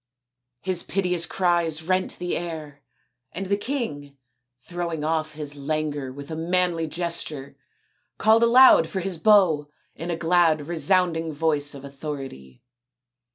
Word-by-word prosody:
His 185 -2 0
piteous 180 -3 -1
cries 170 -3 0
rent 185 +2 0
the 175 0 -3
air, 155 -4 -6 0.5
and 195 +3 -4
the 200 +2 +1
king, 200 - -4 0.4
throwing 170 +1 -5
off 155 -1 -1
his 145 -1 -5
languor 145 -1 -3
with 140 +4 -10
a - - -3
manly 170 0 0
gesture, 155 -5 -4 0.6
called 220 +2 +4
aloud 235 -7 +7
for 185 +4 -3
his 180 -2 -2
bow 165 -7 +4 0.2
in 165 +3 -7
a 170 - 0
glad 165 -2 +3
resounding 165 +1 0
voice 145 -2 0
of 140 0 -10
authority. 135 - -8
165 Hz, 130 wpm, -24 LUFS, 150-180 Hz, 0.6 s, aloud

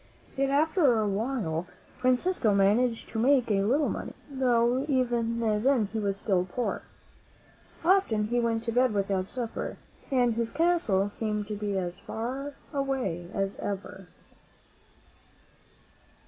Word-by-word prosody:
Yet, 275 0 +1
after 290 - +3
a 215 - +1
while, 200 -6 -2 0.3
Francisco 255 - +2
managed 225 +4 +2
to 225 - -3
make 250 -1 +3
a 195 -1 +3
little 270 +9 +2
money, - - -4 0.2
though 250 -1 +2
even 240 -3 +1
then 225 0 +2
he 225 - -1
was 200 -2 -1
still 190 -3 +1
poor. 245 +3 -2 1.0
Often 285 - +3
he 240 +1 +1
went 230 -1 0
to 230 - -2
bed 245 -1 +2
without 195 -2 0
supper, 240 -1 -4 0.3
and 245 -3 +3
his 230 0 -1
castle 325 - +2
seemed 210 0 -3
to 210 - -2
be 205 -1 -2
as 180 -1 -3
far 270 +5 -5 0.2
away 265 -12 -2
as 195 -1 -2
ever. 195 -1 -5
230 Hz, 135 wpm, -28 LUFS, 205-260 Hz, 1.0 s, after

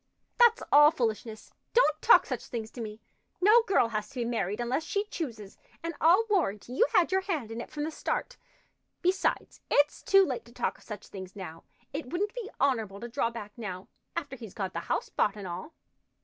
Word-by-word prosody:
"That's 475 -1 +6
all 295 +1 +9
foolishness. 225 -5 -3 0.2
Don't 310 -11 +4
talk 465 - +7
such - - -4
things 225 -2 -5
to 245 - -7
me. 215 0 -7 0.4
No 430 +5 +7
girl 360 -12 +3
has 215 -2 -3
to 275 - -17
be - - 0
married 210 -3 -1
unless 245 +6 -1
she 400 +5 -1
chooses, 235 - -6 0.2
and 335 0 -3
I'll 355 +8 +6
warrant 335 - 0
you 250 +3 +2
had 360 0 +4
your 380 0 +3
hand 315 - -3
in 230 +1 -4
it - - -9
from 295 - -4
the 315 - -2
start. - - -3 0.7
Besides, 370 +2 0
it's 290 +1 +3
too 390 0 +5
late 255 -6 -3
to 235 - -16
talk - - -2
of - - -19
such 210 -2 -8
things 190 -1 -9
now. 165 -5 -8 0.3
It 295 -1 -4
wouldn't 390 - -2
be 475 -4 -6
honorable 225 -8 +1
to 235 - -6
draw 230 0 0
back 220 -3 -8
now, 190 -5 -6 0.3
after 285 -5 -4
he's 225 -6 -10
got 195 -4 -3
the 170 - -2
house - - 0
bought 205 - +1
and 205 -2 -7
all." 185 - -6
245 Hz, 205 wpm, -29 LUFS, 215-335 Hz, 0.7 s, all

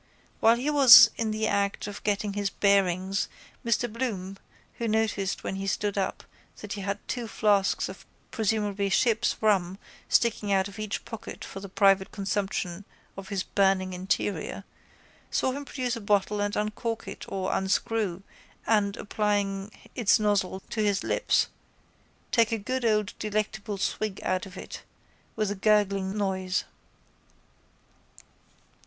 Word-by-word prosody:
While 225 +1 +5
he 265 +5 -1
was 235 -6 +10
in 225 -1 -1
the 215 0 -1
act 200 -1 0
of 205 -1 -7
getting 205 0 0
his 200 -1 -1
bearings 195 -1 +1 0.3
Mr 235 0 +1
Bloom 210 -5 -4 0.4
who 235 - -1
noticed 215 -3 0
when 190 - -3
he 195 0 -4
stood 205 +1 -1
up 195 -2 -2 0.4
that 210 -1 -5
he 205 - -5
had 200 +1 -2
two 240 -3 -3
flasks 205 -3 +2
of - - -10 0.3
presumably 210 -2 0
ship's 230 +3 +2
rum 190 -4 +2 0.3
sticking 225 -3 +2
one 195 - +4
out 190 +1 +1
of 200 +1 -11
each 215 -2 -4
pocket 225 - -8
for 195 - -8
the 195 0 -9
private 195 0 +3
consumption 195 -2 -2 0.3
of 195 -1 -9
his 195 -3 -1
burning 190 -2 +1
interior, 190 0 -2 0.7
saw 260 - +1
him 280 +2 -5
produce 255 -3 -2
a 230 - -6
bottle 205 0 +1
and 205 0 -1
uncork 220 +2 -3
it - - -7
or 190 -1 -2
unscrew 195 -1 0 0.4
and, 205 -2 +2
applying 205 -2 -1 0.2
its 235 -1 +3
nozzle 200 -3 0
to 220 - -1
his 200 -1 +1
lips, - - +2 0.9
take 230 -2 +3
a 225 - +1
good 255 +5 -3
old 210 -2 +1
delectable 215 -1 -2
swig 200 +1 -2
out 185 +1 -1
of 185 0 -12
it - - -8 0.5
with 215 -2 0
a - - 0
gurgling 200 -1 +2
noise. 190 -2 -1
205 Hz, 150 wpm, -27 LUFS, 195-220 Hz, 0.9 s, was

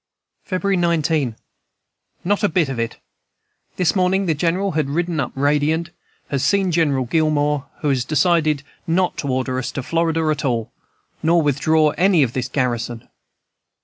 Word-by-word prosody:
"February 195 0 0
19. 160 -7 +1 0.9
"Not 205 +3 0
a 205 - +4
bit 165 -4 +1
of 130 -3 -4
it! 115 0 -3 0.8
This 180 +1 +1
morning 190 +1 +2
the 165 - +2
General 180 +6 0
has 155 -2 0
ridden 165 +2 -1
up - - -2
radiant, 150 +4 +1 0.4
has 140 -2 -1
seen 195 -2 +2
General 145 -6 +1
Gillmore, 150 0 +1
who 150 - 0
has 130 -3 +1
decided 155 0 +2 0.2
not 180 +2 +1
to 140 - -3
order 130 -1 -1
us 130 - -4
to 130 - -4
Florida 165 +1 0
at 150 - -2
all, 120 -4 -1 0.5
nor 165 +1 +3
withdraw 150 +2 +2
any 180 -4 +4
of 120 -3 -2
this 130 -2 -2
garrison. 120 -3 -2
155 Hz, 155 wpm, -20 LUFS, 135-170 Hz, 0.9 s, a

